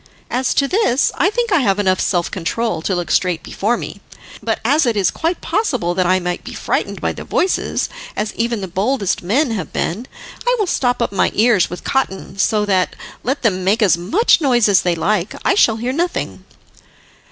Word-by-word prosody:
As 255 +1 0
to 280 - +3
this, 285 - +2
I 340 - +2
think 470 +1 -1
I 345 - +4
have 200 -7 +2
enough 185 -2 +1
self 175 -3 0
control 190 +3 -2
to 185 +3 -1
look 175 -1 -3
straight 180 -3 +1
before 230 +4 -1
me; 200 - -7 0.4
but 225 +1 -1
as 290 +3 +3
it 230 -3 +1
is 195 - +2
quite 330 +2 -2
possible 250 - 0
that 180 0 +1
I 185 +1 +3
might 180 0 -3
be - - -8
frightened - - -2
by - - -1
the - - -8
voices, 370 - 0 0.3
as 210 0 -2
even 230 -2 -1
the 190 - -4
boldest 200 +3 -1
men 245 - +1
have 190 -9 -4
been, 220 +10 -2 0.4
I - - +2
will 425 - +1
stop 245 -8 0
up - - -2
my 195 - +2
ears 215 -4 +3
with 180 - -7
cotton, 195 -7 -2
so 210 +1 +2
that, 190 -3 +1 0.3
let 270 +4 -2
them 190 -5 +1
make 210 +5 +2
as 185 -6 +5
much 335 - +2
noise 245 -6 +3
as 200 -2 +4
they 175 -1 0
like, 205 +6 -1
I - - +4
shall 235 - +4
hear 240 +3 -2
nothing." 345 +4 -2
220 Hz, 205 wpm, -18 LUFS, 185-270 Hz, 0.4 s, as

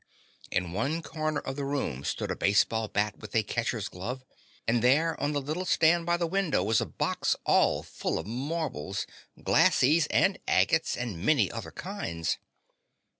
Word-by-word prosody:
In 90 -2 -1
one 150 - -1
corner 155 -2 -2
of 135 +1 -5
the 140 - -2
room 135 - -2
stood - - -2
a - - -1
baseball 110 +2 +2
bat 105 0 -1
with 105 0 -9
a 110 - +4
catcher's 115 0 -2
glove, 125 +8 -6 0.4
and 115 0 +2
there 150 +7 +4
on 145 +1 0
the 145 - +1
little 155 +6 -3
stand 170 -1 +3
by 175 0 +3
the 170 - 0
window 170 - +1
was 110 +2 +2
a - - -2
box - - 0
all - - +3
full - - -3
of 80 - -4
marbles, 120 - -3 0.4
"glassies" 150 +4 +4
and - - +2
agates - - +2
and 105 -9 -4
many 120 - +3
other - - -6
kinds. 85 0 -3
130 Hz, 170 wpm, -28 LUFS, 105-155 Hz, 0.4 s, a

